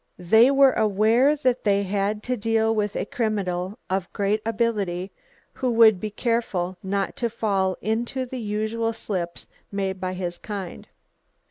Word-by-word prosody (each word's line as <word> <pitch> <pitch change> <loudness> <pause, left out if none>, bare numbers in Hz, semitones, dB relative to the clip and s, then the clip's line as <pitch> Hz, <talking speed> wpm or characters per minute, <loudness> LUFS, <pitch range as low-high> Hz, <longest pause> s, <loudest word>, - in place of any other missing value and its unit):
They 220 +8 +5
were 275 -1 +6
aware 220 +7 +3
that 255 -4 0
they 200 -1 +2
had 205 +2 -1
to 250 - -1
deal 225 0 +1
with 210 -2 -1
a - - -1
criminal 205 -6 -2
of 190 -1 -2
great 205 +2 0
ability 205 -5 -1 0.4
who 255 -2 -1
would 220 -4 +6
be 215 - -3
careful 205 -5 -1
not 195 +1 -2
to 235 - -1
fall 195 -5 0
into 235 +4 -1
the 255 0 -6
usual 220 +2 -1
slips 180 -6 -4 0.3
made 195 -2 -3
by 185 0 -2
his 175 -2 -4
kind. 200 -4 -7
210 Hz, 150 wpm, -24 LUFS, 190-230 Hz, 0.4 s, were